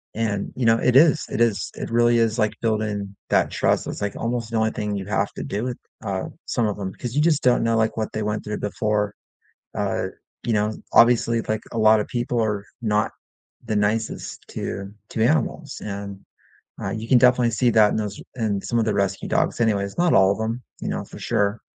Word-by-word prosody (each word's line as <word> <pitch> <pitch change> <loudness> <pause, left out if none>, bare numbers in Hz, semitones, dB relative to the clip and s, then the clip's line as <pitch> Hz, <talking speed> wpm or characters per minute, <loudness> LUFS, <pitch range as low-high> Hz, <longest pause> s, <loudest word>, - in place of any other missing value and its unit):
And, 105 -3 -1
you 125 - -1
know, 115 0 +5
it 125 +1 +2
is 155 +2 +6
it 115 - -2
is, 115 -4 +1
it - - -5
really 120 0 +4
is, 115 0 +1
like, 110 0 +2
building 105 -3 -1
that - - +2
trust, - - +1
it's - - -5
like 100 -1 -2
almost 115 0 -2
the 115 - 0
only 110 0 +2
thing 105 -1 -3
you 95 -1 -4
have 100 0 0
to - - -6
do 105 +3 -3
with, 125 -1 -3 0.3
uh, - - -2 0.2
some 120 - 0
of 105 -1 -3
'em, 95 -1 -4
'cause 120 -2 -6
you 150 - +3
just 155 -2 +2
don't 125 -1 +4
know, 115 0 +2
like, 110 0 +1
what 110 -1 -2
they 110 - -2
went 105 0 -2
through 105 0 -4
before, 105 -1 -1 0.6
uh, - - -1 0.4
you 120 - 0
know? 105 0 +1 0.2
Obviously, 115 -1 +5
like 110 0 -2
a 115 - -3
lotta 110 -1 +5
people 120 -1 -1
are 105 -2 -1 0.2
not 105 -1 +1 0.5
the 110 -2 -1
nicest 105 +2 -1
to 100 +1 -5 0.2
to 110 - 0
animals, 150 +1 0
and, 100 -1 -5 0.6
ah, - - -3
you 110 +1 -5
can 125 - +6
definitely 125 -1 +4
see 120 +2 +2
that 110 -2 +5
in - - -1
those 105 -2 -3
in 110 -5 0
some 120 - -1
of 115 - +2
the 110 -2 0
rescue 100 -1 -1
dogs - - 0
anyways, 100 -3 0
not 175 -1 +3
all 95 0 +6
of 100 - -5
'em, 115 +3 -3 0.2
you - - -3
know, - - -3
for - - -11
sure. 100 +2 0
110 Hz, 220 wpm, -23 LUFS, 105-120 Hz, 0.6 s, is